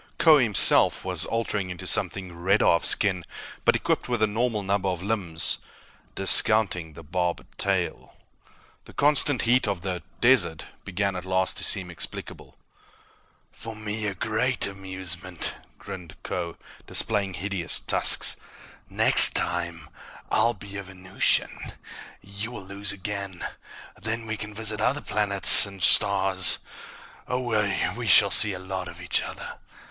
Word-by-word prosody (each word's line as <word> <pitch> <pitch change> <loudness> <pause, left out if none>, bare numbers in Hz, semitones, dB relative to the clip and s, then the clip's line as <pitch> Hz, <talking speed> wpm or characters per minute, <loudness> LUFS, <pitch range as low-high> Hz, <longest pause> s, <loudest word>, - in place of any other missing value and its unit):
Kbo 155 -4 +4
himself 110 -5 +4
was - - -2
altering 105 -4 -4
into 90 -3 -10
something 95 -3 -1
redder 95 +5 -1
of 85 - +1
skin 95 -4 0 0.4
but - - +1
equipped - - -3
with 120 -3 -2
a - - +4
normal 110 0 -4
number 100 0 -3
of 90 -1 -6
limbs, 95 -6 -1 0.6
discounting 95 -4 +2
the 80 - -14
barbed 90 +2 -5
tail. 95 -3 -4 0.7
The - - -17
constant 145 -3 +1
heat 120 0 0
of 100 -4 -4
the 90 -1 -6 0.2
"desert" 85 -11 +1 0.2
began, 100 +1 -4
at 90 - -7
last, 95 0 -3
to - - -3
seem 95 -3 -2
explicable. 85 - -8 0.9
"For 115 -1 -10
me 105 0 -6
a 100 - -6
great 115 +6 -3
amusement," 95 -2 -5 0.2
grinned 90 -4 -12
Kho, 85 -2 -7 0.3
displaying 100 -4 -2
hideous 95 -2 -3
tusks. - - +1 0.5
"Next - - +8
time, 85 -2 -3 0.4
I'll 120 0 0
be 100 0 -12
a 100 - -8
Venusian. 95 0 -4 0.5
You 100 +3 -8
will 100 -6 -11
lose 100 +1 -5
again. 100 -1 -8 0.6
Then 115 +1 -6
we 110 0 -5
can 105 0 -10
visit 110 -1 -1
other 135 +6 -1
planets, 100 -1 +8
and 100 -1 -13
stars... 95 -3 +4 0.7
oh, 120 -5 -3 0.3
we 120 -1 -7
shall 100 +1 +4
see 105 -2 +6
a - - -8
lot 95 0 -8
of - - -12
each - - -2
other!" - - -10
100 Hz, 140 wpm, -23 LUFS, 90-110 Hz, 0.9 s, Next